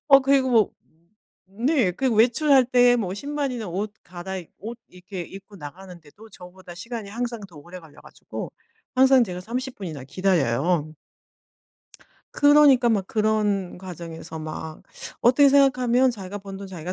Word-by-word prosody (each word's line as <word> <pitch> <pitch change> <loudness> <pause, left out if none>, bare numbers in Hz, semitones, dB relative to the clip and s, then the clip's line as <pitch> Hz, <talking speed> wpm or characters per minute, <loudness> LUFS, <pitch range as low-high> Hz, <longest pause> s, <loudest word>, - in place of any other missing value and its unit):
어 275 -1 +8
그리고 270 -1 +2
뭐 225 -5 +4 0.8
네. 230 - 0
그리고 250 +2 -1
외출할 260 +4 +4
때 245 -1 +4
뭐 190 -5 -3
신발이나 270 -3 -4
옷 205 +4 -4
갈아입 180 0 -8
옷 230 +4 -8
이렇게 180 +1 -9
입고 195 +3 -12
나가는데도 180 +5 -12
저보다 180 -1 -13
시간이 220 +1 -7
항상 235 0 -4
더 165 - -17
오래 175 +5 -11
걸려 155 -2 -17
가지고 - - -9 0.4
항상 265 0 +5
제가 180 -2 -6
30 250 +6 -5
분이나 155 -9 -7
기다려요. 155 -2 0 1.4
그러니까 290 -4 +5
막 200 -5 +1
그런 210 -3 0
과정에서 170 -3 -8
막 155 0 -7 0.4
어떻게 265 +4 +5
생각하면 260 -2 +3
'자기가 200 -3 -7
번 195 -1 -9
돈 200 0 -8
자기가 180 -1 -6
200 Hz, 310 characters per minute, -24 LUFS, 180-245 Hz, 1.4 s, 어